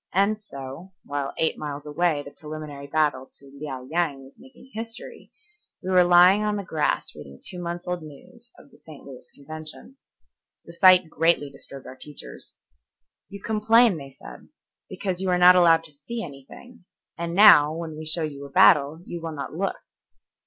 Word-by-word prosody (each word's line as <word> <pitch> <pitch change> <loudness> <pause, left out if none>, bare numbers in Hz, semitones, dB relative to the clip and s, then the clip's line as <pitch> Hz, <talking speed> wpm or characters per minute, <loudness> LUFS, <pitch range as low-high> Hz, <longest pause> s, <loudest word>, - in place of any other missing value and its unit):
And 205 +3 +1
so, 140 +1 -10
while 145 -1 -4
eight 160 - 0
miles 145 -1 -6
away 150 0 0
the 140 - -10
preliminary 150 -2 -9
battle 145 -3 0
to 140 - -18
Liao 140 -3 -7
Yang 150 -1 -2
was 135 - -19
making 265 0 -18
history, 225 +1 -9 0.5
we 185 - -3
were 180 -1 +6
lying 180 +3 +6
on 210 0 0
the 200 - -4
grass 155 - -1
reading 70 -2 -12
two 180 -1 -5
months' 175 0 -5
old 180 -1 -3
news 230 - -14
of - - -18
the - - -21
St. 155 -3 -14
Louis 135 -2 -12
Convention. 155 - -10 0.7
The 170 - -12
sight 180 0 +6
greatly 160 -2 +1
disturbed 140 0 -11
our 130 - -10
teachers. 145 +2 -11 0.7
"You 200 0 -11
complain," 220 -1 +3
they 140 -2 -9
said, 135 - -14 0.4
"because 190 -1 -3
you 190 - -1
are 180 - +2
not 180 +1 +7
allowed 165 -2 +5
to 165 - -11
see 225 +11 -7
anything, 175 - -13 0.3
and 170 0 -4
now, 155 -8 +8
when 160 -1 -6
we 155 0 -8
show 160 +1 -1
you 140 -2 -6
a - - -10
battle, 160 -2 +4
you 170 - -7
will 165 -1 -5
not 140 - -6
look." 195 +5 -2
165 Hz, 180 wpm, -24 LUFS, 145-185 Hz, 0.7 s, now